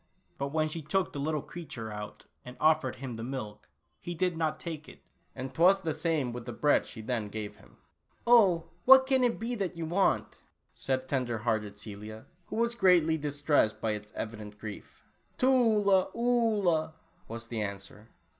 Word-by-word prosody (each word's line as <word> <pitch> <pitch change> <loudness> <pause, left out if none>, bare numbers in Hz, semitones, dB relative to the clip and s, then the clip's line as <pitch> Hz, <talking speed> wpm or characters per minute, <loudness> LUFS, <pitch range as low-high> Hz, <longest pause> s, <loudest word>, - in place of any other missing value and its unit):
But 140 - -1
when 155 +2 0
she 160 +1 -5
took 180 +6 -1
the 145 - -4
little 150 0 -1
creature 130 -10 -7
out 105 0 -8 0.2
and 125 0 -10
offered 155 -5 +3
him 130 -1 -6
the 115 0 -6
milk, 110 -5 -6 0.3
he 175 - -6
did 180 +1 0
not 160 -1 -1
take 160 -3 -6
it, - - -16 0.3
and 130 0 -6
'twas 185 +6 +4
the 160 -2 -1
same 155 -5 -1
with 120 0 -7
the - - -3
bread 145 +5 +2
she 110 - -8
then 110 -2 -2
gave 105 0 -6
him. - - -20 0.5
"Oh, 200 -9 +6 0.2
what 265 0 +9
can 265 -1 +3
it 240 -1 +2
be 230 +2 -3
that 195 -6 -3
you 165 - -3
want?" 180 +4 +1 0.3
said 130 -1 -2
tender 125 -4 -1
hearted 105 -3 -1
Celia, 105 +1 -8 0.2
who - - -6
was 235 +1 +1
greatly 180 -7 +4
distressed 145 -6 +1
by 110 - 0
its 105 0 -6
evident 105 -2 -6
grief 105 -1 -10 0.3
"Tula 220 -7 +4
Oolah," 215 -10 +2 0.3
was 115 +1 -6
the 115 -2 -2
answer. 100 +1 -6
150 Hz, 175 wpm, -30 LUFS, 115-180 Hz, 0.5 s, what